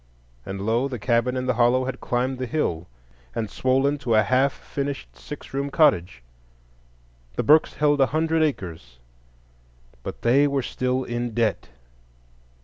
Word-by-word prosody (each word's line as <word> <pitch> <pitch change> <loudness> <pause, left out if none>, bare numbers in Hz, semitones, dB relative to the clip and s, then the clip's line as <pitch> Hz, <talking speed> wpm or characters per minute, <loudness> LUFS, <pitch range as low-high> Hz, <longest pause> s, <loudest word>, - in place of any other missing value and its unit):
And 95 0 -5
lo! 115 +5 +1
the 130 -3 -5
cabin 120 +3 +1
in 130 - -2
the 130 - +1
hollow 120 +2 +3
had 130 - -5
climbed 125 +1 -1
the 130 - -3
hill 90 - -2 0.5
and 110 -2 -3
swollen 135 +3 +1
to 120 -5 0
a 110 - +5
half 130 +5 +2
finished 140 - -5
six - - -10
room 140 +1 -1
cottage. 90 - +2 1.1
The - - -1
Burkes 155 +2 +4
held 145 -1 +2
a 135 - +5
hundred 160 +1 +1
acres, 85 - -3 1.0
but - - -8
they 135 +5 +4
were 140 -2 -1
still 130 +1 -1
in 120 -1 -4
debt. 115 - 0
125 Hz, 150 wpm, -24 LUFS, 110-140 Hz, 1.1 s, a